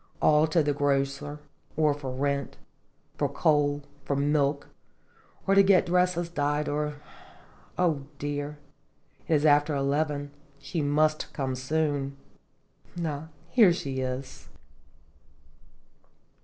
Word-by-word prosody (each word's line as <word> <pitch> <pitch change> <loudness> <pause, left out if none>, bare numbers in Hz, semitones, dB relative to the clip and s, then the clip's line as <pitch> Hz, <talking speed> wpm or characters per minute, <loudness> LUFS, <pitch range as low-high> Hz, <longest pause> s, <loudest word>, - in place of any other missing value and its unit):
all 150 +1 +4
to 160 0 +2
the 145 0 +1
grocer, 140 0 -1 0.4
or 155 -2 +3
for 140 -2 -6
rent, 140 +1 -2 0.6
for - - +1
coal, 145 -2 +1 0.2
for 140 - -1
milk, 140 0 +1 0.8
or 195 - +3
to 195 - +7
get 195 -2 +5
dresses 180 -1 +1
dyed, 150 -2 -1
or 150 0 -1 0.8
O 155 -6 +1
dear! 145 0 -4 0.7
it - - +1
is 150 +1 +2
after 145 0 +4
eleven 145 +1 -1 0.3
j 140 - -22
she 165 +2 -1
must 155 +2 +1
come 135 -3 -2
soon. 140 +1 -1 0.9
Ah! 150 0 -4 0.2
here 220 -8 +6
she 135 -6 -3
is." 130 0 -5
145 Hz, 115 wpm, -27 LUFS, 140-155 Hz, 0.9 s, to